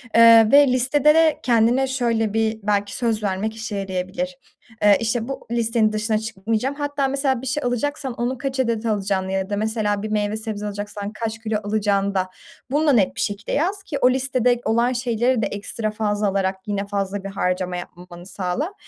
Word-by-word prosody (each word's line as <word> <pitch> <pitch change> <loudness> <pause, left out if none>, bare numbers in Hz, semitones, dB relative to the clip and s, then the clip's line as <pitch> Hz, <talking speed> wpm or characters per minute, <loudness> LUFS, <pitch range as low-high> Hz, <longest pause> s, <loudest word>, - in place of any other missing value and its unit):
Eee, 230 -1 +8
ve 285 0 +7
listede 260 +4 +3
de 320 -1 +3
kendine 240 +2 +3
şöyle 230 -5 0
bir 220 0 0
belki 205 0 0
söz 225 -3 -1
vermek 205 +2 -2
işe 220 -1 -5
yarayabilir. 195 +8 -3 0.5
Eee, 205 -1 +6
işte, 230 0 -1
bu 270 - -6
listenin 230 -2 +2
dışına 215 +1 0
çıkmayacağım. 220 +5 -2
Hatta 285 -1 -1
mesela 270 -2 0
bir 265 - -6
şey 285 +3 -1
alacaksan 265 +2 -2
onu 240 +2 -2
kaç 270 +1 -4
adet 235 -3 0
alacağını 195 -3 -1
ya 190 0 -2
da 205 - -1
mesela 215 -1 -1
bir 215 - -3
meyve 210 0 -1
sebze 215 -2 -4
alacaksan 205 0 -5
kaç 225 0 -4
kilo 220 -1 -1
alacağını 200 -1 0
da 185 -1 0 0.4
bunu 300 +3 +1
da - - +6
net 205 -6 +2
bir - - -3
şekilde 205 0 -3
yaz 385 +6 0
ki 295 - -4
o 250 - +6
listede 250 -2 +1
olan 235 +3 +2
şeyleri 240 0 0
de - - +1
ekstra 215 +2 -4
fazla 210 -1 -1
alarak 195 -1 0
yine 200 -1 -2
fazla 200 -1 -3
bir 195 - -5
harcama 180 -2 -1
yapmamanı 175 0 -10
sağla, 195 - -3
220 Hz, 190 wpm, -22 LUFS, 205-255 Hz, 0.5 s, Eee